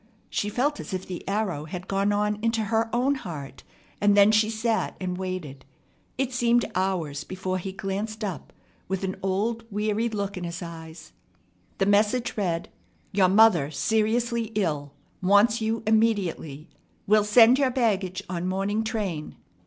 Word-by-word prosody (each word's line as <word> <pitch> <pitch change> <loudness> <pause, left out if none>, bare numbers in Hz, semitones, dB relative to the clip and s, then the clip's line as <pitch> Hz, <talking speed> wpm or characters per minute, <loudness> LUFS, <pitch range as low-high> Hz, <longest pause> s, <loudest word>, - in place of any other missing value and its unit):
She 205 - -1
felt 280 +7 0
as 190 - -5
if 185 - -5
the 180 -2 -6
arrow 195 -8 -1
had 180 +3 -7
gone 195 +1 +1
on 210 0 0
into 230 0 +1
her 225 +1 0
own 250 +4 +2
heart, 165 - -7 0.4
and 205 0 +4
then 200 +1 +7
she 215 0 +3
sat 225 0 -1
and 185 -1 -3
waited. 180 -8 -5 0.5
It 265 -1 -1
seemed 240 0 +3
hours 175 -6 -1
before 185 0 -3
he 190 +2 -5
glanced 205 +3 -4
up, 195 -5 -5 0.4
with 190 +1 -3
an 190 0 -2
old, 210 +5 -1
weary 215 +2 0
look 200 -3 -3
in 180 - -5
his 170 +1 -5
eyes. 160 -1 -10 0.7
The 195 - +2
message 210 +4 +2
read: 175 -5 -1 0.4
"Your 190 -2 +3
mother 195 -8 +5
seriously 225 +6 0
ill. 150 -8 -1 0.3
Wants 205 +5 +4
you 225 +1 -1
immediately. 200 -9 0 0.4
Will 210 +1 +4
send 230 +4 +6
your 270 -2 +3
baggage 200 -7 0
on 180 0 -3
morning 200 +3 -1
train. 200 -9 -3
205 Hz, 155 wpm, -26 LUFS, 185-220 Hz, 0.7 s, then